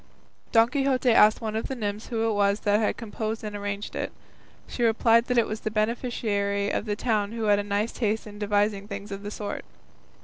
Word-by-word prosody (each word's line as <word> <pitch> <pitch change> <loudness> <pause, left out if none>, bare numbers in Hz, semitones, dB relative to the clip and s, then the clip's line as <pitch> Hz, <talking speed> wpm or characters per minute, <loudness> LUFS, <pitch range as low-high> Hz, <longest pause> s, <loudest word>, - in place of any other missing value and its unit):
Don 225 0 +6
Quixote 270 -2 +2
asked 215 0 +6
one 220 -1 -3
of 220 - -2
the 265 - -4
nymphs 210 -2 -4
who 225 -2 0
it 225 - +1
was 200 0 +2
that 205 0 +3
had 215 - 0
composed 220 0 -4
and 210 -1 -5
arranged 205 0 -4
it. - - -3 0.5
She - - -6
replied 230 0 +4
that 250 -1 0
it 235 - +5
was 215 0 -5
a - - 0
beneficiary 215 -2 -1
of - - -1
the 210 -2 -1
town 210 -2 0
who 230 -1 -3
had 205 -1 +4
a - - -1
nice 205 +2 -1
taste 220 -2 -1
in 205 -1 -10
devising 205 -1 +1
things 200 0 -7
of 195 0 -5
the 205 - -5
sort. 205 -1 -5
215 Hz, 215 wpm, -26 LUFS, 205-225 Hz, 0.5 s, Don